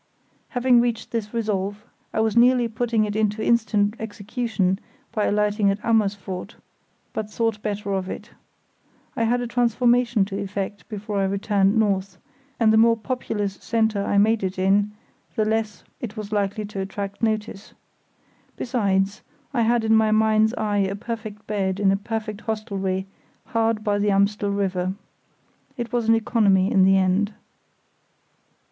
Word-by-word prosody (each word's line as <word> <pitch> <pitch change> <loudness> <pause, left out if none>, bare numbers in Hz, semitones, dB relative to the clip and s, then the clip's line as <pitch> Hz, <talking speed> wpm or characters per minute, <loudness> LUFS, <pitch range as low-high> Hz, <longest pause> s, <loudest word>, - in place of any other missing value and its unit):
Having 245 -2 +4
reached 235 -2 -2
this 220 -3 -3
resolve, 210 -2 -2 0.3
I 220 - 0
was 220 0 +1
nearly 245 0 +5
putting 225 -1 0
it 210 0 -4
into 215 0 0
instant 215 -3 +2
execution, 210 -2 -2 0.3
by 215 - 0
alighting 210 0 +2
at 195 - +1
Amersfoort, 200 -3 -1 0.6
but 215 -1 -3
thought 225 -1 -1
better 205 -1 -3
of 190 -1 -2
it. - - -7 0.8
I 230 - +1
had 245 +2 +1
a - - -2
transformation 240 -2 +2
to 195 0 -5
effect 200 0 -5
before 210 -1 -3
I 195 - +2
returned 200 +1 +1
north, 195 -3 0 0.4
and 220 -2 +4
the 220 - +5
more 230 0 +5
populous 215 -4 -3
centre 220 -3 +1
I 200 - 0
made 215 +1 +3
it 190 0 -2
in 200 +2 +2 0.4
the 215 - +1
less 220 -1 -1 0.2
it 230 -2 -6
was 215 -1 -6
likely 205 0 -1
to 205 -1 -6
attract 195 +1 -5
notice. 215 -2 -2 0.8
Besides, 200 -5 0 0.3
I 240 - +1
had 230 0 +2
in 220 0 +4
my 220 0 +4
mind's 220 +1 +3
eye 210 -2 0
a 195 0 0
perfect 220 -1 -6
bed 195 -2 -1
in 195 -2 +4
a - - +3
perfect 215 +1 -4
hostelry 195 -4 -2 0.4
hard 225 -3 0
by 205 -1 +1
the 205 0 +2
Amstel 200 +1 +2
River. 190 -2 -1 0.8
It 235 -1 -5
was 235 -2 0
an 225 - +7
economy 210 -4 +3
in 190 -1 +5
the 195 0 +5
end. 190 +3 +1
210 Hz, 155 wpm, -23 LUFS, 200-225 Hz, 0.8 s, an